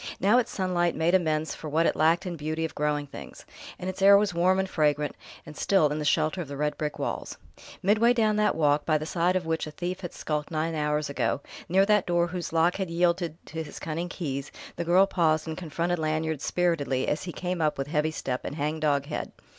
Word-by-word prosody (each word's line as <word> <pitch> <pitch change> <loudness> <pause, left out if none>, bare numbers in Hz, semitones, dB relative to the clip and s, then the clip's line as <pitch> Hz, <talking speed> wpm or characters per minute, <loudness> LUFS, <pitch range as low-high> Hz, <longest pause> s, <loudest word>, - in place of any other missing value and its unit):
Now 210 +6 +4
its 240 - -1
sunlight 180 -3 0
made 165 +2 +1
amends 160 -4 +1
for 155 - -7
what 160 +3 +2
it - - +2
lacked 165 +4 +3
in 180 -2 -3
beauty 155 +1 -2
of 160 - -6
growing 150 -1 -1
things; 140 - -11 0.3
and 180 - -6
its 185 +1 -5
air 200 +1 +8
was 205 -2 +1
warm 180 +2 +3
and 190 0 0
fragrant 150 -4 0 0.3
and 150 - -10
still 175 -2 +3
in 150 - -2
the 150 - -3
shelter 155 +4 +1
of 165 - -6
the 140 0 -7
red 150 0 0
brick 150 -1 -3
walls. - - -4 0.5
Midway 215 +5 +4
down 220 -3 +2
that 210 0 +2
walk, 150 -2 +2
by 155 -1 +2
the 155 - -5
side 175 +3 +1
of 185 -2 0
which 160 -1 -1
a - - -5
thief 175 +4 -4
had 175 - -5
skulked 150 -1 -3
nine 160 +1 -1
hours 150 -1 0
ago, 140 0 -1 0.3
near 190 +3 +4
that 210 -2 +3
door 175 -1 +2
whose 175 0 -5
lock 165 +2 +2
had 190 -3 -2
yielded 170 -1 0
to 160 0 -5
his 150 -2 -8
cunning 165 +2 -4
keys, 140 -6 -4 0.2
the 170 - -2
girl 180 +3 +5
paused 160 -4 +1
and 160 - -3
confronted 170 +1 -2
Lanyard 155 -1 -1
spiritedly 145 -7 0
as 150 - -1
he 175 - -4
came 180 0 -3
up 155 -1 +1
with 135 - -2
heavy 150 +1 0
step 130 -5 -4
and 145 - -5
hang 155 +1 -2
dog 145 -2 +1
head. 150 - -4
160 Hz, 235 wpm, -27 LUFS, 150-180 Hz, 0.5 s, air